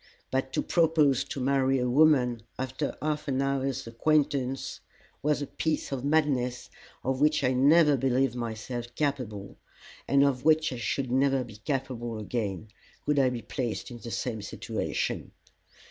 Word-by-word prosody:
But 130 0 -1
to - - 0
propose 160 -6 +3
to - - -5
marry 135 0 +2
a 125 -1 0
woman 125 -4 +4 0.2
after 130 +3 -3
half 150 0 -1
an 135 -1 0
hour's 135 -1 -1
acquaintance 135 +1 0 0.4
was 150 0 +1
a - - -2
piece 155 +1 -2
of 135 -2 -3
madness 140 -5 +1 0.3
of 130 +1 -1
which 150 +1 +3
I 125 - +3
never 145 +3 +5
believed 130 -1 +1
myself 120 0 -4
capable, 125 -9 -3 0.5
and 140 0 +4
of 130 -3 +1
which 155 -2 +3
I - - -5
should 120 +3 -2
never 135 0 +2
be 110 -4 -11
capable 120 -2 -3
again, 105 -2 -3 0.4
could 150 -1 +2
I 130 -2 +4
be 120 -3 -5
placed 115 -1 -4
in 120 - -8
the 115 - -8
same 115 -1 -3
situation. 110 +2 -3
130 Hz, 155 wpm, -28 LUFS, 120-140 Hz, 0.5 s, never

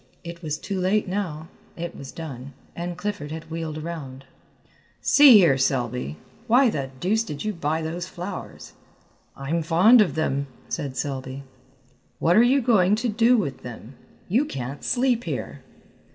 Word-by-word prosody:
It 170 0 -8
was 155 -3 -3
too 195 +2 -4
late 190 +3 +1
now; 175 -5 -3 0.3
it 170 0 -5
was 135 -1 -9
done, 140 -4 -8 0.2
and 175 0 -5
Clifford 205 -5 -4
had 160 +1 -8
wheeled 160 -2 -4
around. 150 -5 -7 0.7
"See 290 -3 +7
here, 160 -9 +4
Selby, 125 - -1 0.3
why 250 +1 +5
the 135 -6 -3
deuce 215 - +1
did 150 -3 -6
you 215 - -1
buy 160 -2 -2
those 170 +3 -4
flowers?" 180 +2 -8 0.6
"I'm 150 +5 -2
fond 185 +9 +6
of 175 -9 +1
them," 140 -3 -1 0.2
said 135 -3 -4
Selby. 135 -1 -4 0.7
"What 170 +2 +2
are 225 - +7
you 260 +3 +4
going 210 -5 +4
to 235 +3 -1
do 230 +3 +4
with 140 - -2
them? 120 0 -9 0.3
You 235 +10 +2
can't 135 - -6
sleep 245 -1 +1
here." - - -5
165 Hz, 155 wpm, -24 LUFS, 140-205 Hz, 0.7 s, See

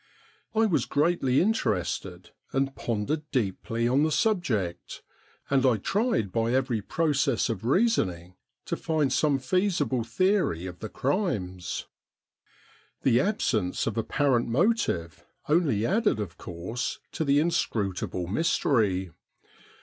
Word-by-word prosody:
I 225 +1 +4
was 185 -7 +1
greatly 145 -3 +2
interested, 95 - -1 0.2
and 135 0 0
pondered 115 +7 -2
deeply 115 -1 -1
on 130 +4 +3
the 155 +1 +2
subject, 130 - -1 0.4
and 135 -2 +2
I 125 -4 +4
tried 200 - 0
by 115 +2 0
every 130 -4 +1
process 135 -1 +1
of 110 -4 -3
reasoning 115 - +1 0.3
to - - -2
find 150 -5 0
some 145 -1 +2
feasible 170 - 0
theory 115 - +1
of 90 -1 -7
the 110 - -6
crimes. 100 - -2 1.2
The 125 -3 +4
absence 115 - 0
of 110 - -2
apparent 120 +2 +1
motive 120 - 0 0.2
only 145 - +2
added 205 - +2
of 95 -5 -4
course 90 +8 -5
to - - -2
the 140 -1 +3
inscrutable 100 - -1
mystery. 100 - +1
125 Hz, 120 wpm, -27 LUFS, 100-160 Hz, 1.2 s, I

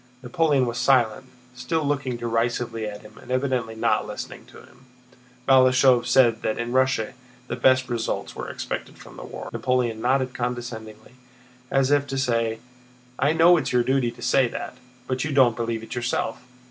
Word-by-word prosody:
Napoleon 140 +1 +2
was 120 0 -3
silent, 130 -1 +2 0.3
still 125 +6 -2
looking 140 -4 -1
derisively 115 -1 -1
at 105 -1 -8
him 105 +1 -15
and - - -16
evidently 130 -3 -1
not 110 - +1
listening - - -8
to - - -15
him. 125 - -18 0.6
Balashëv 130 -1 +5
said 120 -3 +4
that 110 - -1
in 120 0 -3
Russia 130 -3 +1 0.3
the 120 - -4
best 130 +1 +3
results 120 -2 -3
were - - -6
expected - - -6
from - - -14
the - - -9
war. - - -8
Napoleon 125 -3 0
nodded 130 +1 +1
condescendingly, 120 -3 -6 0.6
as 135 0 +2
if 145 -1 +2
to 135 - -4
say, 115 -3 0 0.6
"I 140 +4 +3
know 170 +2 +6
it's - - -2
your 125 -1 +3
duty 130 -1 +1
to 120 0 -11
say 135 -2 +3
that, 120 - -6 0.3
but 130 0 -2
you 150 - -3
don't 130 -4 +4
believe 115 -1 -3
it - - -8
yourself. 120 0 -2
125 Hz, 170 wpm, -24 LUFS, 115-130 Hz, 0.6 s, know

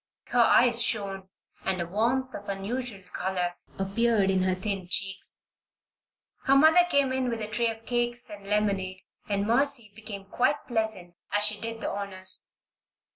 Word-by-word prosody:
Her 245 - +4
eyes 235 0 +5
shone 195 -5 -1 0.3
and 190 -1 0
a 170 - -1
warmth 240 +8 0
of 205 - -7
unusual 200 +1 -4
color 180 -1 -1 0.2
appeared 200 +1 +2
in 190 -1 +2
her 185 0 +2
thin 195 -1 -3
cheeks. 190 +1 -1 1.0
Her 275 - +5
mother 320 +5 +6
came 280 -4 +3
in 260 -1 0
with 230 -1 -2
a 215 - -4
tray 230 +2 0
of 225 0 -7
cakes 240 0 -1
and 200 -1 -10
lemonade, 195 -3 0 0.3
and 200 0 0
Mercy 235 -1 +1
became 205 -2 -8
quite 250 +8 0
pleasant 220 -7 -2 0.2
as 205 0 +4
she 210 0 +2
did 225 0 -5
the - - -1
honors. 190 -2 -3
210 Hz, 160 wpm, -28 LUFS, 195-240 Hz, 1.0 s, mother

